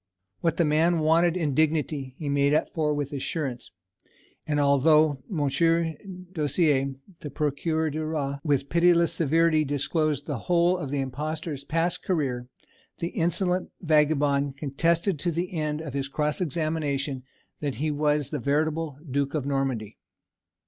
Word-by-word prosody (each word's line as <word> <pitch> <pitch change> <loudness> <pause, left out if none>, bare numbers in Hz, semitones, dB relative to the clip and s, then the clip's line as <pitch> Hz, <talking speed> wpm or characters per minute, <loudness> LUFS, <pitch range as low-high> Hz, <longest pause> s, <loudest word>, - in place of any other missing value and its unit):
_" - - -59 0.4
What 165 - 0
the 170 - +3
man 160 +3 +3
wanted 165 +2 +3
in 155 -5 0
dignity 150 -3 0
he 150 - -5
made 140 +1 +2
up - - 0
for 155 -2 0
with 145 -1 -2
assurance; 135 -3 -3 0.8
and 150 -1 +1
although 145 0 +4
Monsieur 165 +1 +1 0.4
Dossier, 145 -4 +1 0.2
the 150 - -6
Procureur 155 +2 -1
du 155 +1 -3
Roi, 145 -3 -2
with 140 -3 +1
pitiless 170 0 +3
severity 165 0 +3
disclosed 145 +1 -1
the 145 -6 -3
whole 175 +3 +2
of 170 -7 -4
the 145 0 -1
impostor's 150 +2 -4
past 165 +4 -1
career, 130 -9 -1 0.5
the 170 - -3
insolent 180 +2 0
vagabond 145 -3 +2
contested 165 +5 0
to 175 - 0
the 175 +3 -3
end 155 -2 -2
of 150 -5 -7
his 140 -1 -2
cross 150 +4 -1
examination 150 -4 -1 0.4
that 145 -3 -2
he 155 +2 -1
was 150 -1 +1
the 150 - -2
veritable 150 +2 0
Duke 140 +2 -1
of 145 -4 -1
Normandy. 135 -6 -2
150 Hz, 150 wpm, -26 LUFS, 140-165 Hz, 0.8 s, although